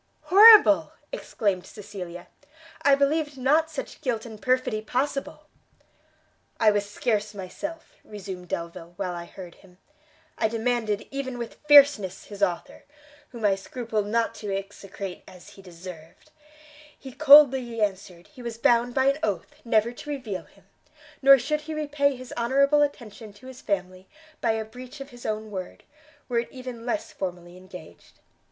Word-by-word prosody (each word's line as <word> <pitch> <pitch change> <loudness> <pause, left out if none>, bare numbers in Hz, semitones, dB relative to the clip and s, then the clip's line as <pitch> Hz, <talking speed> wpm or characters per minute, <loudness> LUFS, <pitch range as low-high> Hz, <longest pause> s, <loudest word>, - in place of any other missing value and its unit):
"Horrible!" 365 - +7 0.2
exclaimed 195 -4 -2
Cecilia, 185 -4 -9 0.6
"I 280 - +5
believed 290 +1 0
not 300 +5 +2
such 310 - -7
guilt 235 -4 -2
and 220 -2 -10
perfidy 255 -3 0
possible!" 270 +5 -3 1.1
"I 220 -2 +5
was 205 0 -1
scarce 210 -1 -1
myself," 300 - -7
resumed 190 -4 -8
Delvile, 170 0 -6
"while 185 -2 -3
I 170 0 -6
heard 180 -1 -11
him: 180 -2 -21 0.6
I - - +3
demanded 225 -2 -1
even 270 -2 -4
with 235 -1 -7
fierceness 280 -10 +6
his 205 -1 -11
author, 180 -4 -2 0.5
whom 235 -3 -5
I 200 - +4
scrupled 215 +1 -4
not 230 +1 0
to 205 -2 -4
execrate 195 -1 -6
as 180 -1 -14
he 195 - -15
deserved; 175 - -12 0.7
he 265 - -10
coldly 270 -5 +6
answered 190 -4 -3
he 270 -4 -14
was 235 -2 -6
bound 240 +1 +2
by 265 -1 +2
an 275 +2 +2
oath 215 +8 -3
never 230 -1 +2
to 270 +4 -11
reveal 245 -10 -5
him, - - -24 0.6
nor 275 0 +8
should 300 +5 -2
he 310 +1 -6
repay 290 -2 0
his 255 0 -10
honourable 275 +5 +3
attention 230 -7 -4
to 205 +5 -18
his 260 -1 -11
family 185 -1 -4 0.3
by 225 - +2
a 220 0 -3
breach 250 +6 -11
of 275 0 -9
his 245 0 -9
own 215 0 -4
word, 185 -2 -7 0.4
were 240 -2 0
it 235 - -5
even 250 -2 -8
less 310 +6 -2
formally 175 -2 -6
engaged. 185 -3 -14
225 Hz, 155 wpm, -25 LUFS, 195-265 Hz, 1.1 s, nor